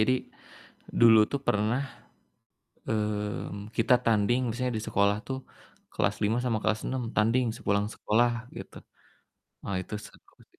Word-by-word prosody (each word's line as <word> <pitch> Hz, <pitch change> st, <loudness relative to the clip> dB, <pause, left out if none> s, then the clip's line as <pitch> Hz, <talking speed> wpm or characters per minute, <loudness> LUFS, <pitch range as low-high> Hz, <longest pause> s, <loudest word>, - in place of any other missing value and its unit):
Jadi, 120 Hz, +4 st, +4 dB, 0.9 s
dulu 115 Hz, -1 st, +8 dB
tuh 140 Hz, -, -1 dB
pernah, 105 Hz, +4 st, +2 dB, 1.1 s
eee, 105 Hz, -1 st, -2 dB
kita 115 Hz, +2 st, +4 dB
tanding 115 Hz, +2 st, +3 dB
misalnya 125 Hz, +2 st, -2 dB
di -, -, -5 dB
sekolah 100 Hz, -1 st, +3 dB
tuh, 130 Hz, 0 st, -3 dB, 0.5 s
kelas -, -, 0 dB
5 110 Hz, +3 st, +2 dB
sama 115 Hz, -3 st, +1 dB
kelas 110 Hz, 0 st, +1 dB
6 130 Hz, -1 st, -2 dB
tanding 115 Hz, +4 st, +3 dB
sepulang 100 Hz, +1 st, 0 dB
sekolah, 120 Hz, +3 st, +2 dB, 0.3 s
gitu. -, -, -9 dB, 0.9 s
Ah, 100 Hz, -, -2 dB
itu 105 Hz, -, -8 dB
seru, -, -, -20 dB, 0.2 s
sih. -, -, -31 dB
110 Hz, 135 wpm, -28 LUFS, 105-120 Hz, 1.1 s, dulu